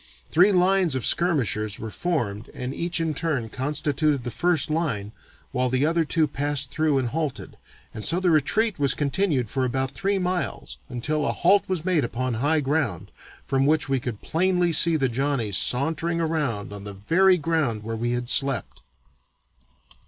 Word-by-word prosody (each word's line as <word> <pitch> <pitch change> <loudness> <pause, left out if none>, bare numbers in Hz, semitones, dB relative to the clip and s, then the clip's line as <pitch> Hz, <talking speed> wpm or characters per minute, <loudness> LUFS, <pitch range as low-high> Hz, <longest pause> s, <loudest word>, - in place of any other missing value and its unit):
Three 185 +5 +5
lines 185 -4 +3
of 130 - -2
skirmishers 115 - +1
were 110 -1 -7
formed 115 - -3
and 125 +1 -4
each 170 +3 -1
in 165 -1 -1
turn 145 -7 -1
constituted 145 +2 -1
the 120 - -4
first 170 0 +1
line 130 -11 -2 0.4
while 125 0 0
the 130 +3 +1
other 165 +1 +2
two 160 +1 +2
passed 145 -1 0
through 155 -2 +1
and 130 -3 -1
halted, 155 0 -4 0.4
and 110 - -7
so 170 - +1
the 185 -2 +2
retreat 185 +7 +1
was 140 -2 +2
continued 145 - 0
for 130 +5 -2
about 130 +1 -1
three 195 +6 -1
miles 180 - -3
until 145 +4 -1
a - - +1
halt 195 +4 +3
was 180 -3 -2
made 180 -6 +2
upon 125 +2 -2
high 150 +2 +2
ground, 135 - -2 0.3
from 135 0 +1
which 155 -1 +2
we 135 -1 0
could 120 -4 -6
plainly 180 +1 +1
see 170 +1 +7
the 135 -4 +1
Johnnies 120 -5 -1
sauntering 160 +6 0
around 150 -12 -2
on 100 -1 -8
the 100 0 -7
very 180 - +3
ground 155 -9 -1
where 115 +1 -4
we 120 +2 -2
had 120 0 -3
slept." 135 -4 +1
145 Hz, 175 wpm, -24 LUFS, 125-165 Hz, 0.4 s, see